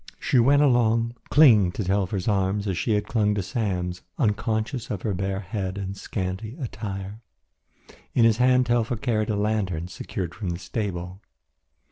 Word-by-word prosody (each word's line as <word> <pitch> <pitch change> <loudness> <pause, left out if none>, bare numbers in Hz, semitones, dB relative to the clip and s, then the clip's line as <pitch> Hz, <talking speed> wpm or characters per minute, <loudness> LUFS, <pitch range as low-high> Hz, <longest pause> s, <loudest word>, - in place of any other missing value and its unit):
She 130 - +2
went 140 +5 +5
along 115 -3 +3 0.2
clinging 110 - +6
to 105 - -3
Telfer's 95 0 -1
arm 100 0 +1
as 95 -3 -1
she 85 +7 0
had 105 - +1
clung 105 -3 +1
to 100 - -1
Sam's, 90 -5 -2 0.2
unconscious 110 +3 -1
of 100 -4 -4
her 105 - 0
bare 95 +1 -2
head 95 -1 -4
and 100 0 -4
scanty 100 +4 -4
attire. 105 -4 -6 0.9
In 115 - +5
his 115 -1 +4
hand 125 +1 +4
Telfer 120 0 +1
carried 110 -2 -1
a 105 - +1
lantern 100 -5 -1
secured 90 -1 -5
from 95 0 -4
the 85 - -2
stable. 90 0 -4
105 Hz, 160 wpm, -25 LUFS, 95-115 Hz, 0.9 s, clinging